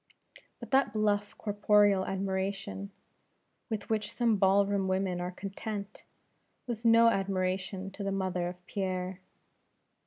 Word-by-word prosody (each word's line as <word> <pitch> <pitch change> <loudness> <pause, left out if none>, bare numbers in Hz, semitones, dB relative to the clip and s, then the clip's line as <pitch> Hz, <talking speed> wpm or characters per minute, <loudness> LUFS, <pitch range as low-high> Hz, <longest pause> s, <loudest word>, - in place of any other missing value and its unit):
But - - -10
that 265 -5 +3
bluff 205 -1 0
corporeal 205 -2 +3
admiration, 195 +1 -3 0.8
with 220 -1 -4
which 215 -1 -1
some 235 -3 +2
ball 195 +1 +4
room 200 -1 0
women 185 -1 0
are 180 - -2
content, 200 +2 -6 0.6
was 235 -3 -4
no 230 0 +7
admiration 190 -1 -1
to 200 +1 -7
the 195 - -1
mother 185 -2 -1
of 180 0 -8
Pierre. 185 -1 -3
195 Hz, 125 wpm, -30 LUFS, 190-210 Hz, 0.8 s, no